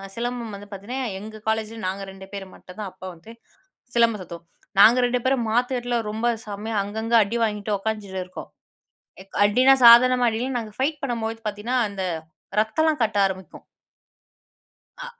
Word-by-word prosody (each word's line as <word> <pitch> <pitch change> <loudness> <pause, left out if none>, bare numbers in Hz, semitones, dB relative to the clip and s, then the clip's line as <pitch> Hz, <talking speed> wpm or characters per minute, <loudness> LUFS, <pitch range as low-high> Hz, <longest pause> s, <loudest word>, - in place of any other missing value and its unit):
சிலம்பம் 235 -2 -4
வந்து 205 +1 -11
பாத்தீங்கன்னா, 205 +7 -6 0.2
எங்க 215 +1 -10
காலேஜில 220 0 -1
நாங்க 195 +1 -3
2 190 0 -12
பேர் 195 -1 -5
மட்டு 180 - -14
தான் 205 -3 -4
அப்ப 185 - -18
வந்து 170 +7 -14 0.6
சிலம்பம் 230 -4 +3
சுத்துவோம். 170 -1 -10 0.3
நாங்க 225 +4 +8
2 245 0 0
பேரும் 260 -3 +2
மாத்து 245 +3 +1
கட்ல 245 0 -1
ரொம்ப 225 +2 -1 0.2
செம்மையா 210 +2 -5
அங்கங்க 220 +3 -4
அடி 225 +4 -3
வாங்கிட்டு 210 -1 -1
உக்காந்த்துட்டு 200 -3 -4
இருக்கோம். 185 - -10 0.9
அடினா 255 +6 +5
சாதாரணமா 245 +1 +8
அடில்ல 245 +4 -3
நாங்க 215 -2 -8
ஃபைட் 295 +3 -1
பண்ணும்போது 225 -3 -2
பாத்தீங்கன்னா, 210 +5 -2
அந்த 195 -1 -6 0.6
ரத்தம்லாம் 300 +6 0
கட்ட 220 -2 -1
ஆரம்பிக்கும். 190 -1 -6 1.4
அ - - -6
220 Hz, 150 wpm, -24 LUFS, 205-240 Hz, 1.4 s, நாங்க